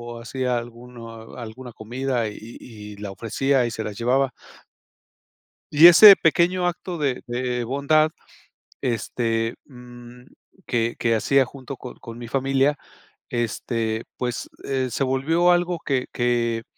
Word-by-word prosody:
o 115 Hz, -, -9 dB
hacía 125 Hz, 0 st, -2 dB
alguno 115 Hz, -1 st, -10 dB
alguna 120 Hz, +1 st, -9 dB
comida 120 Hz, +1 st, -3 dB
y 105 Hz, -, -6 dB, 0.3 s
y 105 Hz, -3 st, -11 dB
y -, -, -19 dB
la 100 Hz, -1 st, -6 dB
ofrecía 125 Hz, +5 st, 0 dB
y 120 Hz, -, -3 dB
se 110 Hz, -, -4 dB
la 105 Hz, -, -5 dB
llevaba. 130 Hz, +4 st, +1 dB, 1.4 s
Y 155 Hz, +3 st, +9 dB
ese 195 Hz, +3 st, +10 dB
pequeño 175 Hz, +2 st, +2 dB
acto 175 Hz, 0 st, -4 dB
de 140 Hz, -5 st, -2 dB
de 125 Hz, 0 st, -2 dB
bondad, 140 Hz, +5 st, +2 dB, 0.7 s
este, 115 Hz, -1 st, -1 dB
mm, 125 Hz, -1 st, -14 dB, 0.4 s
que 115 Hz, -1 st, -1 dB
que 115 Hz, -1 st, +1 dB
hacía 135 Hz, +4 st, +3 dB
junto 135 Hz, 0 st, -9 dB
con -, -, -9 dB
con 115 Hz, 0 st, -11 dB
mi 120 Hz, -, -8 dB
familia, 135 Hz, +3 st, +1 dB, 0.5 s
este, 115 Hz, -1 st, -2 dB
pues, 125 Hz, -1 st, -4 dB, 0.2 s
eh, 130 Hz, -2 st, -1 dB
se 135 Hz, -, -1 dB
volvió 160 Hz, +7 st, +2 dB
algo 175 Hz, -1 st, +1 dB
que 130 Hz, -3 st, -1 dB
que 120 Hz, -2 st, 0 dB
125 Hz, 140 wpm, -23 LUFS, 115-135 Hz, 1.4 s, ese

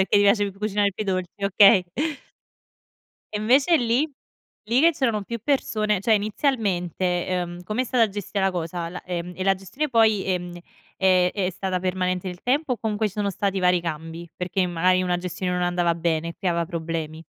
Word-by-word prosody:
perché 190 Hz, -, +3 dB
ti -, -, +5 dB
piace 205 Hz, 0 st, +3 dB
cu 195 Hz, -, -18 dB
cucinare 205 Hz, -1 st, +1 dB
più 215 Hz, -, -4 dB
i -, -, -10 dB
dolci, 185 Hz, -2 st, -1 dB
okay. 195 Hz, -1 st, +6 dB, 1.5 s
E 210 Hz, -, -2 dB
invece 270 Hz, +10 st, +4 dB
lì? 255 Hz, +5 st, +1 dB, 0.5 s
Lì 235 Hz, +5 st, +2 dB
che 335 Hz, +2 st, +6 dB
c'erano 235 Hz, -9 st, 0 dB
più 235 Hz, +3 st, -5 dB
persone, 215 Hz, -8 st, 0 dB
cioè 220 Hz, +3 st, +3 dB
inizialmente, 195 Hz, -, 0 dB
ehm, 175 Hz, -1 st, -3 dB
come 215 Hz, +7 st, -1 dB
è -, -, -3 dB
stata 235 Hz, -3 st, +2 dB
gestita 200 Hz, 0 st, -4 dB
la 195 Hz, -, +2 dB
cosa? 170 Hz, -1 st, -4 dB
La, 180 Hz, -, -7 dB
ehm, 180 Hz, 0 st, -4 dB
e 185 Hz, -, -3 dB
la 195 Hz, 0 st, +4 dB
gestione 195 Hz, +11 st, -4 dB
poi, 220 Hz, -5 st, +3 dB
ehm, 180 Hz, -2 st, -3 dB, 0.4 s
è 185 Hz, -1 st, +3 dB
è 190 Hz, -3 st, -1 dB
stata 185 Hz, 0 st, -2 dB
permanente 185 Hz, 0 st, -1 dB
nel 180 Hz, -1 st, -7 dB
tempo 270 Hz, +2 st, +1 dB
o -, -, -1 dB
comunque 215 Hz, 0 st, -1 dB
ci 200 Hz, -, -5 dB
sono 205 Hz, -1 st, -1 dB
stati 195 Hz, 0 st, -1 dB
vari 180 Hz, -1 st, +3 dB
cambi? 165 Hz, +1 st, -6 dB
Perché 180 Hz, +1 st, -1 dB
magari 180 Hz, +2 st, +2 dB
una 180 Hz, -1 st, 0 dB
gestione 180 Hz, +1 st, -3 dB
non 180 Hz, 0 st, -1 dB
andava 175 Hz, -1 st, +1 dB
bene 165 Hz, -1 st, -1 dB
e -, -, -10 dB
creava 170 Hz, -3 st, -1 dB
problemi. 160 Hz, -1 st, -5 dB
190 Hz, 195 wpm, -24 LUFS, 175-215 Hz, 1.5 s, okay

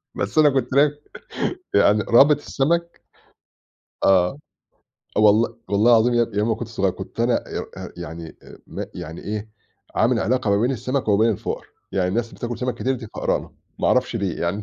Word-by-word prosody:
بس -, -, -3 dB
أنا 150 Hz, -1 st, +7 dB
كنت 130 Hz, -2 st, -1 dB
بك 145 Hz, +1 st, +3 dB, 0.7 s
يعني 105 Hz, 0 st, +4 dB
رابط 140 Hz, +5 st, +6 dB
السمك 170 Hz, +4 st, -1 dB, 1.0 s
آه، 95 Hz, +6 st, +3 dB, 0.8 s
والله 110 Hz, +2 st, +4 dB
والله 105 Hz, +4 st, +4 dB
العظيم 120 Hz, +1 st, +4 dB
يابني، 115 Hz, -3 st, 0 dB
يوم 105 Hz, +2 st, +1 dB
ما 110 Hz, -, +2 dB
كنت 115 Hz, 0 st, -6 dB
صغير 100 Hz, -5 st, 0 dB
كنت 95 Hz, +4 st, -10 dB
أنا 120 Hz, +1 st, +1 dB
إيؤ -, -, -4 dB
أأ -, -, -7 dB
يعني 80 Hz, +1 st, -8 dB
أ -, -, -14 dB
م -, -, -5 dB
يعني 80 Hz, +2 st, -8 dB
إيه، 105 Hz, +1 st, -5 dB, 0.5 s
عامل 115 Hz, +1 st, +2 dB
علاقة 120 Hz, -2 st, 0 dB
ما 100 Hz, -, +3 dB
بين 125 Hz, +3 st, +2 dB
السمك 125 Hz, +1 st, -2 dB
وين 110 Hz, +3 st, +4 dB
الفُقرا، 100 Hz, -, -4 dB, 0.3 s
يعني 90 Hz, -2 st, +1 dB
الناس 115 Hz, +4 st, -2 dB
بتاكل 120 Hz, 0 st, -5 dB
سمك 125 Hz, 0 st, -2 dB
كتير 130 Hz, +1 st, -1 dB
دي 115 Hz, -2 st, -8 dB
فقرانة، -, -, -2 dB, 0.3 s
ما -, -, +1 dB
أعرفش 125 Hz, -2 st, +2 dB
ليه 100 Hz, -5 st, -2 dB
يعني. 90 Hz, +5 st, -1 dB
115 Hz, 175 wpm, -22 LUFS, 100-130 Hz, 1.0 s, أنا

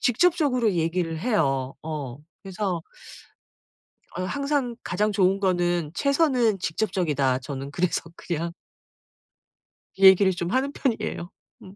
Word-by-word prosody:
직접적으로 255 Hz, -, +2 dB
얘기를 165 Hz, -1 st, -1 dB
해요. 140 Hz, -, 0 dB
어 150 Hz, -6 st, -5 dB, 0.3 s
그래서 190 Hz, -3 st, -3 dB, 1.4 s
어 185 Hz, -, -2 dB
항상 280 Hz, +2 st, -1 dB
가장 210 Hz, +4 st, 0 dB
좋은 195 Hz, -1 st, +2 dB
거는 175 Hz, -4 st, 0 dB
최선은 260 Hz, -, +2 dB
직접적이다. 160 Hz, -8 st, 0 dB
저는 135 Hz, +1 st, -6 dB
그래서 175 Hz, +3 st, 0 dB
그냥 170 Hz, -1 st, -3 dB, 1.5 s
얘기를 190 Hz, 0 st, +7 dB
좀 175 Hz, 0 st, -3 dB
하는 265 Hz, +4 st, +1 dB
편이에요. 225 Hz, -10 st, -2 dB, 0.3 s
음. 190 Hz, +1 st, -13 dB
185 Hz, 250 characters per minute, -25 LUFS, 165-225 Hz, 1.5 s, 얘기를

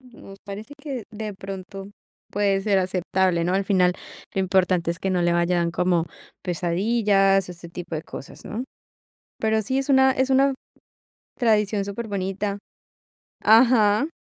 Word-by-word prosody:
Nos 230 Hz, -6 st, -14 dB
parece 210 Hz, +7 st, -8 dB
que 275 Hz, -6 st, -5 dB
de 215 Hz, -1 st, -6 dB
pronto 195 Hz, 0 st, -8 dB, 0.4 s
puede 200 Hz, -1 st, +1 dB
ser 195 Hz, -1 st, +2 dB
aceptable, 185 Hz, -1 st, 0 dB
¿no? 180 Hz, +2 st, 0 dB
Al 195 Hz, 0 st, +1 dB
final, 180 Hz, -2 st, +3 dB, 0.4 s
lo 195 Hz, -, +1 dB
importante 185 Hz, -2 st, +2 dB
es 170 Hz, -, -4 dB
que 190 Hz, -, -2 dB
no 180 Hz, -1 st, +1 dB
le 175 Hz, 0 st, +2 dB
vayan 170 Hz, 0 st, +1 dB
como 175 Hz, -1 st, +1 dB, 0.4 s
pesadillas, 195 Hz, +2 st, +2 dB
ese 170 Hz, -1 st, -10 dB
tipo 170 Hz, 0 st, -7 dB
de 155 Hz, -, -3 dB
cosas, -, -, -10 dB
¿no? 235 Hz, +4 st, -4 dB, 0.8 s
Pero 220 Hz, 0 st, +1 dB
sí, 260 Hz, +6 st, -1 dB
es 270 Hz, -, -2 dB
una 265 Hz, -1 st, +5 dB
es 260 Hz, 0 st, 0 dB
una 270 Hz, +1 st, +4 dB, 0.8 s
tradición 210 Hz, -4 st, +2 dB
superbonita 200 Hz, -1 st, -3 dB, 0.9 s
ajá. 220 Hz, +1 st, +5 dB
195 Hz, 145 wpm, -24 LUFS, 180-220 Hz, 0.9 s, una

